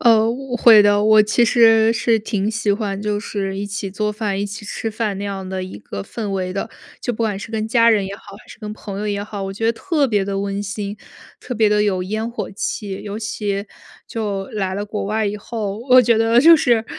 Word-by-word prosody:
呃， 225 Hz, -2 st, +5 dB
我 255 Hz, 0 st, -4 dB
会 225 Hz, -3 st, +8 dB
的， 205 Hz, 0 st, +3 dB
我 215 Hz, 0 st, +6 dB
其 215 Hz, +3 st, +2 dB
实 225 Hz, -1 st, +5 dB
是 230 Hz, -1 st, +2 dB
挺 210 Hz, -1 st, -2 dB
喜 220 Hz, -2 st, 0 dB
欢 200 Hz, -2 st, -3 dB
就 210 Hz, 0 st, -1 dB
是 195 Hz, -3 st, -4 dB
一 205 Hz, -, -3 dB
起 200 Hz, -1 st, -4 dB
做 210 Hz, +2 st, -1 dB
饭、 205 Hz, -2 st, -2 dB
一 205 Hz, -, -1 dB
起 205 Hz, +1 st, -8 dB
吃 225 Hz, +2 st, -4 dB
饭 215 Hz, -2 st, -2 dB
那 200 Hz, -, -4 dB
样 195 Hz, -2 st, -5 dB
的 190 Hz, 0 st, -3 dB
一 185 Hz, -, -8 dB
个 100 Hz, -1 st, -7 dB
氛 215 Hz, -, -6 dB
围 185 Hz, -1 st, -2 dB
的， 195 Hz, +4 st, -3 dB, 0.3 s
就 245 Hz, -, -2 dB
不 -, -, -9 dB
管 210 Hz, -3 st, -1 dB
是 210 Hz, -, -8 dB
跟 220 Hz, 0 st, -2 dB
家 230 Hz, 0 st, +5 dB
人 210 Hz, -3 st, +2 dB
也 195 Hz, -, -6 dB
好， -, -, -19 dB, 0.2 s
还 -, -, -20 dB
是 -, -, -12 dB
跟 210 Hz, -2 st, -6 dB
朋 200 Hz, -2 st, -7 dB
友 210 Hz, -, -3 dB
也 205 Hz, 0 st, -2 dB
好， 205 Hz, -1 st, -6 dB
我 195 Hz, -, -4 dB
觉 225 Hz, +3 st, -2 dB
得 230 Hz, -, +3 dB
特 295 Hz, +1 st, 0 dB
别 205 Hz, -3 st, +1 dB
地 195 Hz, 0 st, -2 dB
温 200 Hz, 0 st, -3 dB
馨， 205 Hz, 0 st, -5 dB, 0.4 s
特 250 Hz, -, -5 dB
别 220 Hz, -1 st, +3 dB
地 210 Hz, 0 st, +3 dB
有 190 Hz, -3 st, 0 dB
烟 215 Hz, +4 st, -3 dB
火 235 Hz, -, -5 dB
气。 195 Hz, 0 st, -4 dB
尤 210 Hz, +1 st, -5 dB
其 205 Hz, -2 st, -3 dB, 0.4 s
就 205 Hz, -4 st, -3 dB
来 190 Hz, -3 st, -3 dB
了 205 Hz, +1 st, -3 dB
国 210 Hz, -1 st, -4 dB
外 215 Hz, +1 st, 0 dB
以 205 Hz, +1 st, -2 dB
后， 210 Hz, -1 st, -4 dB
我 255 Hz, 0 st, +9 dB
觉 235 Hz, -1 st, +3 dB
得 225 Hz, +1 st, +4 dB
就 330 Hz, +3 st, +8 dB
是， 240 Hz, -6 st, +2 dB
210 Hz, 260 characters per minute, -20 LUFS, 200-225 Hz, 0.4 s, 我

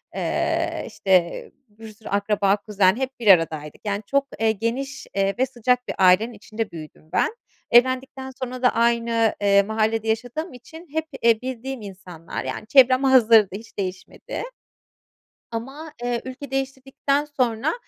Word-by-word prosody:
Eee, -, -, -1 dB
işte, 185 Hz, -3 st, 0 dB, 0.2 s
bir 220 Hz, +1 st, -12 dB
sürü 220 Hz, +1 st, -12 dB
akraba, 200 Hz, 0 st, +1 dB
kuzen 200 Hz, -2 st, +2 dB
hep 265 Hz, +1 st, -4 dB
bir 230 Hz, -, -4 dB
aradaydık. 160 Hz, -5 st, +3 dB
Yani, 205 Hz, 0 st, -2 dB
çok, 280 Hz, 0 st, +1 dB
eee, 225 Hz, 0 st, +3 dB
geniş, 235 Hz, +6 st, -4 dB
eee, 195 Hz, 0 st, +1 dB
ve 260 Hz, -, +4 dB
sıcak 250 Hz, 0 st, 0 dB
bir -, -, -4 dB
ailenin 190 Hz, +5 st, +4 dB
içinde 220 Hz, 0 st, -5 dB
büyüdüm 155 Hz, -1 st, -11 dB
ben. 455 Hz, -, +1 dB, 0.4 s
Evlendikten 260 Hz, +2 st, +2 dB
sonra 255 Hz, 0 st, -5 dB
da 250 Hz, -, +5 dB
aynı, 230 Hz, -1 st, +2 dB
eee, 200 Hz, 0 st, +5 dB
mahallede 220 Hz, +1 st, -1 dB
yaşadığım 245 Hz, +9 st, -2 dB
için 320 Hz, +8 st, -13 dB
hep, 320 Hz, 0 st, -1 dB, 0.2 s
eee, 230 Hz, -1 st, +4 dB
bildiğim 260 Hz, 0 st, -5 dB
insanlar, 185 Hz, -5 st, -8 dB
yani, 215 Hz, -, -5 dB
çevrem 260 Hz, +1 st, +5 dB
hazırdı, 230 Hz, -6 st, +6 dB
hiç 225 Hz, +3 st, -11 dB
değişmedi. 185 Hz, -2 st, -5 dB, 1.1 s
Ama, 270 Hz, +7 st, -6 dB
ııı, 240 Hz, -1 st, -1 dB
ülke 260 Hz, +2 st, -8 dB
değiştirdikten 270 Hz, +1 st, -1 dB
sonra, 255 Hz, -2 st, 0 dB
230 Hz, 145 wpm, -23 LUFS, 205-260 Hz, 1.1 s, hazırdı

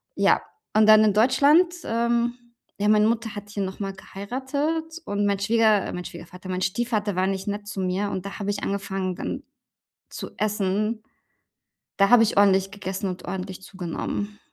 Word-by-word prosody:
Ja. -, -, +3 dB, 0.3 s
Und 215 Hz, 0 st, +5 dB
dann 215 Hz, 0 st, +8 dB
in 210 Hz, -, +4 dB
Deutschland, 285 Hz, -, +4 dB
ähm, 235 Hz, +1 st, +1 dB, 0.5 s
ja, 205 Hz, -, +1 dB
meine 210 Hz, 0 st, +5 dB
Mutter 225 Hz, -1 st, -1 dB
hat 205 Hz, 0 st, -8 dB
hier 205 Hz, 0 st, -4 dB
nochmal 195 Hz, +1 st, -4 dB
geheiratet. 280 Hz, -, -3 dB
Und 205 Hz, 0 st, -1 dB
mein 200 Hz, -1 st, +1 dB
Schwieger 215 Hz, -1 st, +3 dB
mein 180 Hz, 0 st, -5 dB
Schwiegervater, 180 Hz, +2 st, -10 dB
mein 185 Hz, 0 st, -2 dB
Stiefvater 210 Hz, 0 st, -1 dB
war 185 Hz, +1 st, +1 dB
nicht 195 Hz, 0 st, -3 dB
nett 205 Hz, 0 st, -3 dB
zu 195 Hz, -2 st, -4 dB
mir. 190 Hz, +2 st, -1 dB
Und 190 Hz, 0 st, -4 dB
da 200 Hz, -, -6 dB
habe 200 Hz, -1 st, -3 dB
ich 205 Hz, 0 st, -4 dB
angefangen, 195 Hz, -2 st, -2 dB
dann -, -, -4 dB, 0.7 s
zu -, -, -7 dB
essen. 210 Hz, +1 st, 0 dB, 1.0 s
Da 195 Hz, 0 st, +4 dB
habe 245 Hz, -2 st, +8 dB
ich 220 Hz, -, -1 dB
ordentlich 195 Hz, -1 st, +4 dB
gegessen 195 Hz, -1 st, -4 dB
und 185 Hz, -1 st, -6 dB
ordentlich 190 Hz, 0 st, -5 dB
zugenommen. 195 Hz, +3 st, -5 dB
205 Hz, 170 wpm, -25 LUFS, 190-225 Hz, 1.0 s, dann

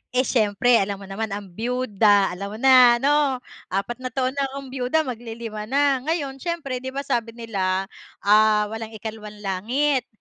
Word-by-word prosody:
eh 255 Hz, +1 st, +3 dB
siyempre 225 Hz, +1 st, +2 dB
alam 200 Hz, 0 st, -2 dB
mo 195 Hz, -, -11 dB
naman 205 Hz, +3 st, -4 dB
ang 200 Hz, -2 st, -8 dB
biyuda, 215 Hz, -3 st, +2 dB
alam 200 Hz, +2 st, -5 dB
mo -, -, -7 dB
na 255 Hz, -1 st, +7 dB
'no. 280 Hz, +1 st, +2 dB, 0.3 s
4 200 Hz, +6 st, -3 dB
na 255 Hz, -, -3 dB
taon 255 Hz, 0 st, -1 dB
na 280 Hz, -1 st, -1 dB
akong 270 Hz, -1 st, -8 dB
biyuda, 270 Hz, +5 st, +1 dB
mag 250 Hz, -4 st, -5 dB
li 230 Hz, -2 st, -8 dB
5 215 Hz, -2 st, -6 dB
na. 275 Hz, +1 st, +2 dB
Ngayon 280 Hz, -2 st, -2 dB
siyempre 330 Hz, -7 st, -3 dB
'di 260 Hz, -, -5 dB
ba 280 Hz, -, -2 dB
sabi 235 Hz, -4 st, -2 dB
nila, 195 Hz, -5 st, -1 dB, 0.4 s
ah, 210 Hz, +1 st, +5 dB
walang 225 Hz, 0 st, -6 dB
ikalawang 215 Hz, 0 st, -8 dB
langit, 245 Hz, +8 st, 0 dB
235 Hz, 180 wpm, -23 LUFS, 210-265 Hz, 0.4 s, na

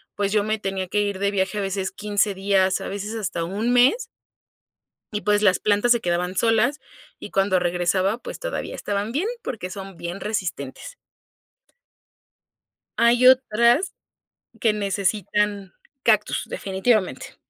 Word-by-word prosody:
pues, 200 Hz, -1 st, -1 dB
yo 210 Hz, -1 st, +3 dB
me 215 Hz, +1 st, -1 dB
tenía 195 Hz, -2 st, -3 dB
que 205 Hz, +3 st, 0 dB
ir 200 Hz, -2 st, -2 dB
de 200 Hz, 0 st, +1 dB
viaje 195 Hz, +1 st, -1 dB
a -, -, -1 dB
veces 195 Hz, -1 st, -2 dB
15 205 Hz, 0 st, 0 dB
días 190 Hz, -1 st, +1 dB
a -, -, -5 dB
veces 205 Hz, +3 st, -5 dB
hasta 190 Hz, -6 st, -3 dB
1 210 Hz, +7 st, -1 dB
mes 265 Hz, -, +4 dB, 1.1 s
y, 210 Hz, -, -2 dB
pues, 210 Hz, 0 st, +2 dB
las 185 Hz, -4 st, +4 dB
plantas 210 Hz, +3 st, +2 dB
se 240 Hz, -, +5 dB
quedaban 180 Hz, -1 st, -1 dB
solas, 230 Hz, +6 st, +2 dB, 0.4 s
y -, -, -9 dB
cuando 195 Hz, -1 st, +2 dB
regresaba, 180 Hz, +4 st, +1 dB
pues, -, -, -8 dB
todavía -, -, -4 dB
estaban 205 Hz, +2 st, -3 dB
bien, 310 Hz, -, -1 dB, 0.2 s
porque 205 Hz, -7 st, -5 dB
son 195 Hz, -1 st, -8 dB
bien 175 Hz, +3 st, -6 dB
resistentes. 195 Hz, -, -4 dB, 2.0 s
Hay 235 Hz, +2 st, +4 dB
otras 255 Hz, -, +4 dB, 0.7 s
que 220 Hz, -2 st, +3 dB
necesitan, 200 Hz, 0 st, -1 dB, 0.3 s
cactus 215 Hz, -2 st, +2 dB
definitivamente. 190 Hz, -, -1 dB
205 Hz, 140 wpm, -23 LUFS, 190-225 Hz, 2.0 s, se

